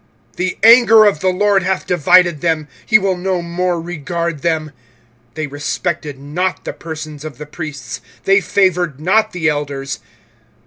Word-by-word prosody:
25:004:016 - - -32
The 185 +1 -2
anger 225 -1 +7
of 200 -7 +2
the 185 - -1
LORD 195 +1 +2
hath 185 +1 -1
divided 175 -1 +3
them; 160 -3 0 0.2
he 215 - +6
will 195 -2 0
no 180 -1 -2
more 175 +1 -1
regard 170 -1 -4
them: 160 -3 -1 0.6
they 155 - -2
respected 145 +1 -4
not 165 +7 -3
the - - -4
persons 155 -2 -8
of 155 -5 -8
the 150 - -8
priests, 145 -5 -7 0.2
they 195 +1 +4
favoured 180 -7 +1
not 190 +8 +2
the 170 -2 -1
elders. 140 -2 -3
170 Hz, 155 wpm, -17 LUFS, 150-185 Hz, 0.6 s, anger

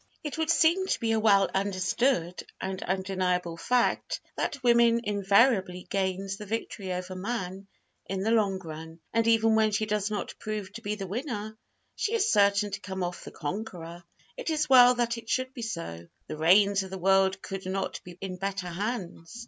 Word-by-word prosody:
It 300 +1 -5
would 320 -1 0
seem 340 +3 +4
to - - 0
be 225 -1 0
a 225 - +2
well 200 -3 +5
understood 190 0 0 0.2
and 190 0 -4
undeniable 185 -2 -1
fact 245 +8 0 0.2
that 280 -3 -3
woman 235 -1 +5
invariably 200 -2 +2
gains 195 0 -1
the 210 - -8
victory 205 -3 -4
over 180 +1 -4
man 190 -1 -4 0.4
in 190 0 -2
the 220 - +1
long 205 -4 +2
run; 160 -2 -9
and 230 0 +2
even 225 -1 +4
when 220 0 +4
she 215 +1 0
does 210 -1 -1
not 210 -1 -3
prove 210 -2 -5
to 230 - -8
be 210 0 -2
the 195 -2 -5
winner, 215 - -4 0.4
she 445 - -1
is 450 0 +2
certain 200 0 +3
to 200 +1 -5
come 190 -1 -4
off 175 0 -4
the - - -8
conqueror. 175 0 -6 0.3
It - - -4
is 305 -1 0
well 250 -2 +8
that 235 -1 0
it 230 0 -13
should 255 +2 -1
be 255 - -7
so. 165 - -5 0.2
The - - -6
reins 195 +5 +4
of 190 - -7
the 190 - -5
world 190 +1 +3
could 195 -1 -6
not 190 +1 -3
be 175 -1 -11
in 185 -2 -5
better 195 -1 -3
hands! 190 0 -5
200 Hz, 190 wpm, -28 LUFS, 185-230 Hz, 0.4 s, well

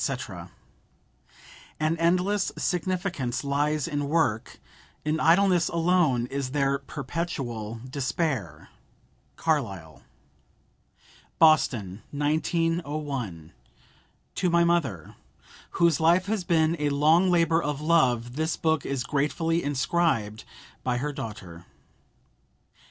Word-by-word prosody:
"An 155 +1 +1
endless 180 +4 +1
significance 180 - -2
lies 145 +1 0
in 145 -3 -2
work; 145 -9 0 0.5
in 155 +1 0
idleness 180 +1 +4
alone 165 -7 +2
is 135 +1 -4
there 140 -1 +1
perpetual 125 -9 -5
despair."—CARLYLE. 125 - -4 1.4
BOSTON: 120 - +3
1901. 145 - -2 0.8
TO 180 - 0
MY 170 0 +4
MOTHER, 145 - -1 0.5
WHOSE 170 -3 +2
LIFE 170 +3 +4
HAS 200 -3 -2
BEEN 165 -1 +2
A 150 -1 +1
LONG 155 +6 +4
LABOR 165 -2 +3
OF 145 -2 -3
LOVE, 130 -7 +2
THIS 160 +1 -1
BOOK 160 -3 +1
IS 135 -3 -2
GRATEFULLY 160 +4 0
INSCRIBED 135 -6 0 0.4
BY 125 -1 0
HER 145 +4 -3
DAUGHTER. 90 -9 -8
150 Hz, 90 wpm, -26 LUFS, 125-170 Hz, 1.4 s, idleness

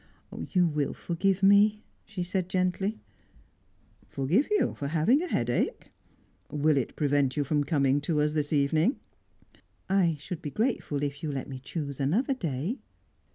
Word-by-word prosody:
"You 180 -2 +3
will 150 -4 -1
forgive 190 +3 -1
me?" 205 +2 +5 0.2
she 195 -5 -4
said 180 0 -2
gently. 185 +2 0 1.1
"Forgive 165 - +1
you 420 -1 +2
for 140 - -4
having 170 - +3
a 360 - -3
headache? 120 - -1 0.6
Will 150 +1 +2
it 135 -4 -1
prevent 145 -2 +1
you 145 - +2
from 145 +1 +1
coming 140 -1 +2
to 150 +1 0
us 150 0 +1
this 150 -1 -1
evening?" 155 - +2 0.9
"I 185 -4 +2
should 165 +3 -6
be 150 - -4
grateful 185 - -1
if 145 +1 -3
you 155 - -2
let 135 -2 -4
me 130 -2 -7
choose 140 0 -5
another 200 - +1
day." 170 - -3
155 Hz, 155 wpm, -28 LUFS, 145-195 Hz, 1.1 s, me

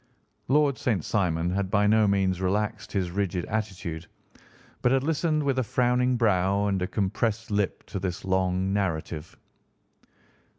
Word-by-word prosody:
Lord 145 0 +3
St. 105 -10 0
Simon 85 -4 0
had 95 0 -1
by 105 0 +3
no 110 0 +4
means 95 -2 +1
relaxed 100 +3 -1
his 95 -3 -1
rigid 95 -2 -1
attitude, 90 -6 -4 0.7
but 125 - +3
had 135 0 +2
listened 155 0 +1
with 135 -2 +1
a - - +2
frowning 125 +2 +1
brow 100 -3 +2
and 95 -2 0
a 90 - 0
compressed 105 +3 -1
lip 105 -1 -1
to 100 - -5
this 90 -1 -4
long 95 0 +1
narrative. 80 -5 -3
100 Hz, 145 wpm, -26 LUFS, 95-115 Hz, 0.7 s, no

